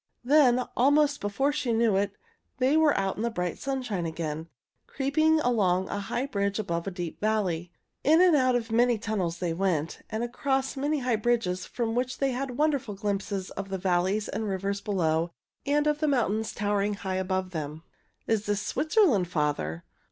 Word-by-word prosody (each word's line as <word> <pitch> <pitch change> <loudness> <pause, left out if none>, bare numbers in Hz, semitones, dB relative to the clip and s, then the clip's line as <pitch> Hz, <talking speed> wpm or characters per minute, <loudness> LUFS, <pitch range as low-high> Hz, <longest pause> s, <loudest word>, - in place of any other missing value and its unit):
Then, 255 -2 +5
almost 285 +3 +3
before 235 +8 0
she 270 -5 -1
knew 225 -2 +3
it, 200 0 0 0.4
they 260 +3 +3
were 315 -2 +4
out 195 -1 -1
in - - -3
the 235 - +1
bright 180 -6 -3
sunshine 245 -10 -2
again, 160 0 -4 0.4
creeping 310 +4 +2
along 190 -7 +1
a 205 - -2
high 240 +6 -2
bridge 200 -6 -1
above 170 -4 -2
a - - -2
deep 175 -2 -6
valley. 185 -6 0 0.3
In 315 +3 +5
and 360 -3 +6
out 255 -3 +3
of 230 -2 -2
many 240 +1 +3
tunnels 200 -6 -2
they 170 -1 -2
went, 165 -3 -1
and 220 +2 -2
across 265 +2 -1
many 290 +1 -1
high 245 -3 +1
bridges 215 -5 0
from 230 -2 -2
which 250 +1 -1
they 275 -1 +1
had 255 0 -4
wonderful 280 -8 0
glimpses 200 -1 -3
of 195 0 -6
the 190 - -2
valleys 185 +3 +1
and 220 +2 -3
rivers 200 +1 -2
below 165 -4 0 0.4
and 295 +1 +2
of 300 0 +1
the 310 - +1
mountains 220 -5 +1
towering 205 0 0
high 190 -2 -3
above 185 0 -1
them. 155 -1 -5 0.4
"Is 215 -2 0
this 205 -1 +1
Switzerland, 290 - +2
father?" 145 - -1
215 Hz, 180 wpm, -27 LUFS, 185-260 Hz, 0.4 s, and